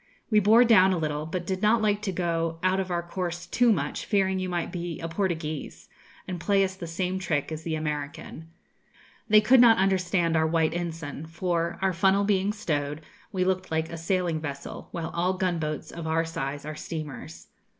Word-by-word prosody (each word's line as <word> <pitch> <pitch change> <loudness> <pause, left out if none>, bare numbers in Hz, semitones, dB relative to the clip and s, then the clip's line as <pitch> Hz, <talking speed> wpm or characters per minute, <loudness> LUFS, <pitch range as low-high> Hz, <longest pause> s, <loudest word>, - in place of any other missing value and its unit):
We 215 - +6
bore 220 +4 +6
down 190 -5 +6
a - - 0
little, 155 -1 -2
but 175 +1 -4
did 185 +1 -2
not 220 +2 +4
like 210 -1 +1
to 210 -3 -2
go 165 -2 -1
out 185 +1 +2
of 190 -1 -2
our 175 -1 -1
course 175 -1 -4
too 240 +6 +3
much, 150 -8 -1
fearing 190 -3 +1
you 185 0 -2
might 175 -2 -2
be 175 -2 -5
a 165 - -4
"Portuguese," 165 -4 -3 0.4
and 180 -2 -4
play 200 +2 +3
us 190 0 -1
the 185 -3 -8
same 180 +3 -2
trick 160 -5 -1
as 155 0 -4
the 160 -1 -2
American.' 150 +1 -5 0.8
(They 215 0 +7
could 245 +4 +6
not 230 -2 +7
understand 185 -3 +1
our 160 0 +3
white 160 -1 +1
ensign; 160 -3 -5
for, 170 0 -1
our 190 -1 +2
funnel 195 +3 +3
being 200 0 +2
stowed, 150 -8 -2 0.3
we 185 -3 0
looked 185 0 -1
like 160 +1 -1
a 170 - -5
sailing 170 -1 0
vessel, 140 -2 -6
while 165 -2 -5
all 180 +2 +1
gunboats 165 -5 -2
of 165 -1 -6
our 165 +1 +1
size 145 -3 -4
are 155 0 -5
steamers.) 155 -4 -7
175 Hz, 195 wpm, -27 LUFS, 160-190 Hz, 0.8 s, They